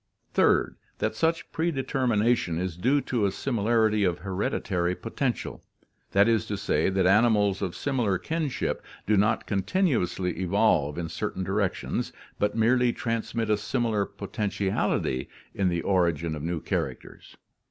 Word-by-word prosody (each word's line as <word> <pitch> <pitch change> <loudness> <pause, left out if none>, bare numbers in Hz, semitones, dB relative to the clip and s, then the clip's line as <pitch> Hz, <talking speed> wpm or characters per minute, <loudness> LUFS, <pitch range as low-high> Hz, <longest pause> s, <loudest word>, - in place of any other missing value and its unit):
"Third: - - +3 0.2
That - - -1
such 165 +7 0
predetermination 125 - +1
is 90 -1 -2
due 130 - +2
to 115 -7 0
a - - -1
similarity 110 -2 +1
of 90 -3 +1
hereditary 90 -2 -1
potential. 120 +4 -3 0.5
That 100 +2 +5
is 115 -5 +2
to - - -2
say 75 +4 +1
that 95 -1 +1
animals 105 -1 +4
of 90 - -2
similar 120 -9 0
kin 160 - -2
ship - - -2 0.2
do 105 - +3
not 105 +3 +2
continuously 95 - 0
evolve 90 -6 +2
in 85 -1 -2
certain 95 +2 -3
directions, 95 0 -1 0.3
but 105 +2 0
merely 120 +2 +3
transmit 115 -1 -2
a 105 - +3
similar 105 0 0
potentiality 100 -9 -1 0.2
in 95 -2 +1
the 85 -1 -1
origin 85 -4 +1
of 75 - -5
new 85 +1 -2
characters. - - -5
105 Hz, 140 wpm, -27 LUFS, 90-115 Hz, 0.5 s, That